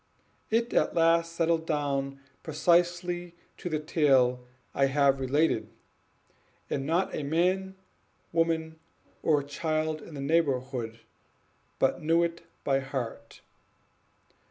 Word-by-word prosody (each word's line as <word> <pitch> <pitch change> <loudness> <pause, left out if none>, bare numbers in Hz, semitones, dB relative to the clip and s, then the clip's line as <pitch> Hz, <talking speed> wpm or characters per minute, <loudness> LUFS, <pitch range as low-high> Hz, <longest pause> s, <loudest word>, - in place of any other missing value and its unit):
It 230 +2 +1
at - - +2
last 165 0 +3
settled 165 -1 +1
down 140 -2 -1 0.2
precisely 175 +2 +1 0.2
to 175 - -5
the 155 - 0
tale 135 -5 +3 0.3
I 135 - +3
have 140 0 +3
related, 130 -5 +1 1.0
and 135 0 -1
not 170 +4 +1
a - - -2
man, 180 +6 0 0.6
woman, 160 -1 0 0.4
or 150 -3 +2
child 155 +1 -2
in 160 - -11
the 140 - -5
neighborhood 130 -6 0 0.8
but - - +1
knew 165 +2 +3
it 170 0 -2 0.2
by 135 -1 +2
heart. 125 -4 -6
155 Hz, 110 wpm, -28 LUFS, 135-170 Hz, 1.0 s, last